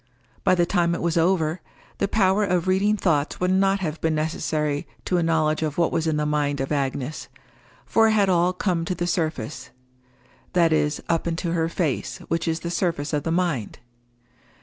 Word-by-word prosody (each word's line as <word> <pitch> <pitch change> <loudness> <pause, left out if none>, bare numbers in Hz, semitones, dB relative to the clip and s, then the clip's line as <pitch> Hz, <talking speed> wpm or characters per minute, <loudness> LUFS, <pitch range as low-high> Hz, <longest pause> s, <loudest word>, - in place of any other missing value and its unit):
By - - +4
the 175 -1 +3
time 170 -1 +1
it - - -5
was 170 -1 0
over, 165 -1 +1 0.4
the - - +1
power 195 0 +2
of 180 -2 0
reading 200 +3 +2
thoughts 155 -7 0
would 180 0 +1
not 195 +1 +2
have 160 -3 -3
been 160 -1 +1
necessary 155 -1 -1 0.2
to 180 - +1
a - - +2
knowledge 160 -2 +1
of 155 -2 -2
what 170 -1 +2
was 165 0 0
in 155 -1 +1
the 150 - 0
mind 145 -2 0
of 135 +2 -3
Agnes, 140 0 -2 0.6
for 225 0 +4
it 220 - +3
had 205 -2 +3
all 180 -1 +3
come 180 -2 -1
to 180 - -2
the 175 - -2
surface—that 130 - -3
is 150 -1 0
up 165 0 0
into 170 +1 -2
her 165 -1 0
face, 165 -6 -2
which 165 +1 -1
is 165 0 -1
the 170 - -4
surface 165 -5 -1
of 150 - +1
the 165 - -2
mind. 165 - -1
165 Hz, 195 wpm, -24 LUFS, 150-180 Hz, 0.6 s, By